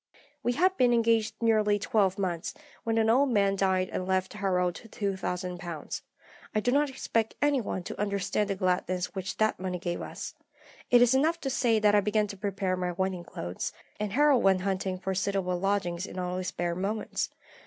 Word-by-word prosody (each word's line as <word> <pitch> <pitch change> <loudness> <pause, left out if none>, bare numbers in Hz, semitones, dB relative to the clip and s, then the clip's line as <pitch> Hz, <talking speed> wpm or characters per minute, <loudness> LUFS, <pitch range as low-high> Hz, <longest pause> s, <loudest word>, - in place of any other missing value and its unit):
"We 245 - +1
had 370 +7 +3
been 245 -1 +4
engaged 225 -2 +2
nearly 215 -2 +3
twelve 200 -2 +1
months, 180 -4 -2 0.3
when 225 0 0
an 220 -1 +3
old 265 +5 +4
man 200 -4 +3
died 190 -1 +1
and 185 - -2
left 190 0 0
Harold 180 -3 +1
£2000. 180 -5 -4 0.5
I - - +4
do 245 +3 +1
not 290 +2 +3
expect 230 -4 -1
any 290 -3 +3
one 190 -4 -3
to - - -5
understand 200 0 0
the 195 - 0
gladness 185 -1 0
which 190 -1 -4
that 215 -3 +1
money 185 -1 -2
gave 175 -1 -3
us. - - -6 0.6
It 245 0 +7
is 245 +1 +4
enough 315 +6 +2
to 270 - -2
say 235 -3 +2
that 210 -1 +4
I 205 - +5
began 210 +1 +2
to 200 - -7
prepare 195 -2 -1
my 180 -1 -2
wedding 190 0 -2
clothes, 90 - -5 0.3
and 210 -1 -2
Harold 285 -1 +5
went 190 -1 +4
hunting 190 -1 -1
for 190 +1 -3
suitable 190 -2 0
lodgings 190 -2 0
in - - -9
all 180 0 -2
his 185 0 -3
spare 175 -1 -2
moments. 200 +5 -2
195 Hz, 190 wpm, -29 LUFS, 185-225 Hz, 0.6 s, It